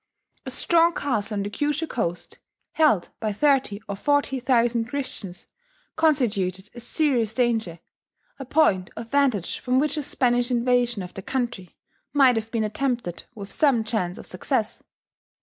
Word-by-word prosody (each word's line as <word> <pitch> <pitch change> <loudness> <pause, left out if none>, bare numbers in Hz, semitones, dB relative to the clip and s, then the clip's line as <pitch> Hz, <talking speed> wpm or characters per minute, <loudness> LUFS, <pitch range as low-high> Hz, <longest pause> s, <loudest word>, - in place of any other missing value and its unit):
A - - -1
strong 335 0 +3
castle 220 -5 -1
on 200 - -1
the 205 - -5
Kyushu 295 +7 -1
coast, 175 - -3 0.3
held 300 - +3
by 215 -2 -1
thirty 260 -3 +2
or 200 - -3
forty 285 +3 +1
thousand 240 -2 +2
Christians, 225 -8 -5 0.5
constituted 205 - +1
a 240 - -9
serious 240 -4 0
danger, 225 -8 0 0.6
a 270 - -6
point 225 - +2
of 225 0 -7
vantage 265 -10 +1
from 255 0 0
which 300 +1 0
a - - 0
Spanish 245 -3 +1
invasion 245 -3 +1
of 180 - -9
the 195 - -7
country 240 -6 -3 0.4
might 270 -4 +5
have 225 0 -3
been 225 -1 -1
attempted 235 -4 -2
with 200 -2 -8
some 275 -7 +3
chance 215 -5 -2
of - - -9
success. 220 +4 -2
240 Hz, 150 wpm, -24 LUFS, 205-275 Hz, 0.6 s, might